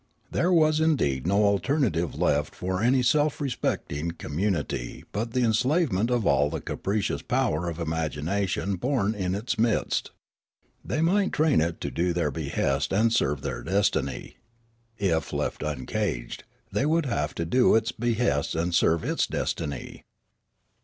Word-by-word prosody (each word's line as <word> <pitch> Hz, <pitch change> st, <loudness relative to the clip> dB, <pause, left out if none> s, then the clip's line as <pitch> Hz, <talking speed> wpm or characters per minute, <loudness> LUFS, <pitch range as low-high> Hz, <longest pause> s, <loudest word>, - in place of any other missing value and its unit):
There 180 Hz, -, +1 dB
was 155 Hz, -3 st, +4 dB
indeed 85 Hz, -, +1 dB
no 100 Hz, +3 st, +3 dB
alternative 100 Hz, -, +1 dB
left 75 Hz, 0 st, +1 dB
for 95 Hz, +1 st, -2 dB
any 125 Hz, +2 st, +3 dB
self 150 Hz, +3 st, +2 dB
respecting 85 Hz, -, -2 dB
community 80 Hz, -6 st, -3 dB
but 115 Hz, +3 st, -3 dB
the 125 Hz, -1 st, +2 dB
enslavement 120 Hz, -, +2 dB
of 120 Hz, -4 st, +1 dB
all 70 Hz, -5 st, +3 dB
the 80 Hz, +1 st, -3 dB
capricious 100 Hz, +6 st, -2 dB
power 85 Hz, +3 st, 0 dB
of 85 Hz, 0 st, -6 dB
imagination 85 Hz, +4 st, -1 dB
born 115 Hz, -1 st, 0 dB
in 95 Hz, -3 st, -2 dB
its 110 Hz, +4 st, -3 dB
midst. 115 Hz, -1 st, +1 dB, 0.7 s
The}' 155 Hz, -, -1 dB
might 195 Hz, +4 st, +2 dB
train 150 Hz, -, +3 dB
it 85 Hz, +1 st, -1 dB
to -, -, -3 dB
do 85 Hz, +1 st, 0 dB
their 85 Hz, -4 st, 0 dB
behests 70 Hz, -2 st, -1 dB
and 110 Hz, +4 st, +3 dB
serve 75 Hz, -, +1 dB
their -, -, -3 dB
destiny; 95 Hz, -8 st, -1 dB, 0.6 s
if 85 Hz, -6 st, 0 dB
left -, -, -2 dB
uncaged, 65 Hz, -4 st, -3 dB, 0.3 s
they 140 Hz, -, +1 dB
would 165 Hz, 0 st, +2 dB
have 75 Hz, -, -2 dB
to 85 Hz, -, -2 dB
do 125 Hz, +9 st, +4 dB
its 115 Hz, +1 st, +2 dB
behests 115 Hz, -, 0 dB
and 85 Hz, +2 st, -1 dB
serve 85 Hz, -1 st, +3 dB
its -, -, 0 dB
destiny. 70 Hz, -3 st, -4 dB
100 Hz, 145 wpm, -26 LUFS, 80-125 Hz, 0.7 s, was